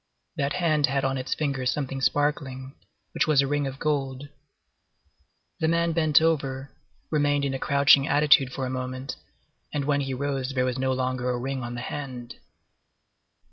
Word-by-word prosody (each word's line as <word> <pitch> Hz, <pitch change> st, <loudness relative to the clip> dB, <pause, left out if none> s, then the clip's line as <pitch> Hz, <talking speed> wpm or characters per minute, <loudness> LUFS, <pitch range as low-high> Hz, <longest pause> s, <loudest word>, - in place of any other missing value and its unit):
That 140 Hz, 0 st, -1 dB
hand 155 Hz, -5 st, +2 dB
had 135 Hz, +1 st, 0 dB
on 135 Hz, 0 st, 0 dB
its 130 Hz, -, -2 dB
finger 140 Hz, -4 st, -2 dB
something 135 Hz, 0 st, -2 dB
sparkling, 135 Hz, -1 st, -1 dB, 0.4 s
which -, -, +1 dB
was 145 Hz, -3 st, +4 dB
a -, -, -1 dB
ring 145 Hz, 0 st, 0 dB
of 135 Hz, 0 st, -6 dB
gold. 140 Hz, -2 st, -2 dB, 1.3 s
The 160 Hz, -, +1 dB
man 170 Hz, +1 st, +2 dB
bent 155 Hz, -2 st, +4 dB
over, 135 Hz, -4 st, -1 dB, 0.4 s
remained 145 Hz, -2 st, +2 dB
in 135 Hz, -, -1 dB
a 135 Hz, -, -3 dB
crouching 140 Hz, 0 st, +4 dB
attitude 145 Hz, -2 st, +4 dB
for 130 Hz, 0 st, -3 dB
a -, -, -3 dB
moment, 130 Hz, +1 st, -4 dB, 0.6 s
and 145 Hz, -2 st, -2 dB
when 145 Hz, -1 st, +1 dB
he 135 Hz, -1 st, -3 dB
rose 135 Hz, 0 st, -3 dB
there 125 Hz, 0 st, +2 dB
was 130 Hz, 0 st, -2 dB
no 130 Hz, 0 st, +1 dB
longer 130 Hz, -1 st, -1 dB
a 125 Hz, -, 0 dB
ring 135 Hz, +1 st, -3 dB
on 120 Hz, 0 st, -5 dB
the 120 Hz, -, -5 dB
hand. 125 Hz, -3 st, -6 dB
135 Hz, 175 wpm, -26 LUFS, 130-145 Hz, 1.3 s, was